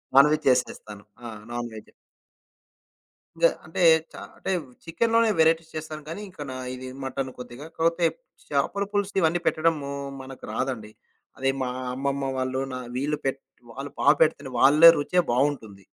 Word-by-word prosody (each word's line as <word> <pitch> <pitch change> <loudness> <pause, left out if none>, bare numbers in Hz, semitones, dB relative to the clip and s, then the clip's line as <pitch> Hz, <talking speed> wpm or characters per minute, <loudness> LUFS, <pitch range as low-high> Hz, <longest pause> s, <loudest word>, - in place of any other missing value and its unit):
Non veg 150 +3 +6
చేసేస్తాను. 105 -4 -1 0.2
ఆ! - - -6 0.2
Non-veg. 120 -2 -6 1.4
ఇంగా - - +5 0.2
అంటే, 165 +4 -5 0.3
చ - - -24 0.2
అంటే - - -4 0.3
చికెనులోనే 230 +7 +2
వెరైటీస్ 160 0 +3
చేస్తాను 155 0 -6
గానీ, 165 +5 -5
ఇంక 185 - -20
నా - - -5 0.2
ఇది 130 0 -8 0.2
మటను 135 0 -3
కొద్దిగా. 125 +3 -9
కాపోతే 165 +1 +1 0.4
చేాపల 150 +8 0
పులుసు 205 -1 -1
ఇవన్నీ 170 0 +2
పెట్టడము 155 -3 +1 0.3
మనకు 130 0 -11
రాదండి. 125 -5 -3 0.5
అది 135 0 +1
మా 125 - -1 0.3
అమ్మమ్మ 135 +1 -1
వాళ్ళు 130 0 -1
నా 130 - -4 0.2
వీళ్ళు 145 +3 -1
పెట్ 135 0 -1 0.3
వాళ్ళు 135 +3 -7
బా - - -1
పెడుతునే 155 -4 +2
వాళ్ళే 150 +5 +9
రుచే 165 +5 +2
బావుంటుంది. 120 -7 -1
140 Hz, 140 wpm, -25 LUFS, 130-165 Hz, 1.4 s, వాళ్ళే